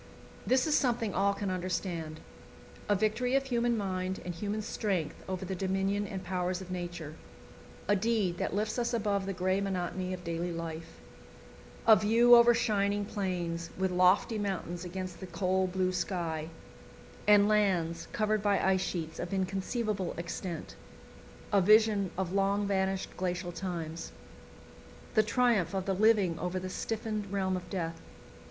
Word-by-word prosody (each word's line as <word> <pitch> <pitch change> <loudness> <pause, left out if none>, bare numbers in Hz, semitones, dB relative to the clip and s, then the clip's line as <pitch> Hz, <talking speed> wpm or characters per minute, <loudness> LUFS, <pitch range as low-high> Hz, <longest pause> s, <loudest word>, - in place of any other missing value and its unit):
This 255 0 +3
is 310 - +1
something 235 -7 +1
all 200 +1 +2
can 200 -1 -2
understand. 175 -3 -3 0.7
A 205 - +4
victory 220 +6 +1
of 275 - +3
human 240 -3 +1
mind 185 -2 -2
and 180 - -3
human 205 +5 -3
strength 190 -7 -2
over 185 0 -3
the 190 - -3
dominion 195 +2 0
and 195 -3 -5
powers 180 0 -1
of 185 -1 -9
Nature; 175 -4 -5 0.7
a 205 - +4
deed 205 -4 0
that - - -1
lifts 215 +3 -1
us 240 0 0
above 200 -3 0
the - - -1
grey 185 +2 0
monotony 185 -1 -2
of 180 -1 -5
daily 170 +1 -2
life; 165 -1 -6 0.9
a 220 - +9
view 230 +4 +5
over 235 0 +7
shining 205 -3 +1
plains, 175 -5 -3
with 190 0 0
lofty 185 +5 +3
mountains 185 -4 -3
against 185 0 -6
the 190 - -7
cold 185 +2 0
blue 185 0 +1
sky, 170 -4 -2 0.8
and 205 -1 +7
lands 185 -6 +1
covered 215 -1 +1
by 205 -1 +2
ice 190 -1 +2
sheets 160 -4 -4
of 175 - -4
inconceivable 195 +1 -2
extent; 170 0 -5 0.8
a 200 - +5
vision 210 0 +5
of 185 -1 -2
long 200 +1 +2
vanished 190 -1 -1
glacial 180 -1 -2
times; 170 -3 -5 1.0
the 215 - +5
triumph 215 -6 +2
of 190 -1 -1
the 195 - 0
living 200 -4 +3
over 180 +1 -2
the 185 0 -5
stiffened 215 -1 -3
realm 190 -2 0
of 180 -1 -6
death. 165 -4 -3
190 Hz, 155 wpm, -31 LUFS, 180-210 Hz, 1.0 s, a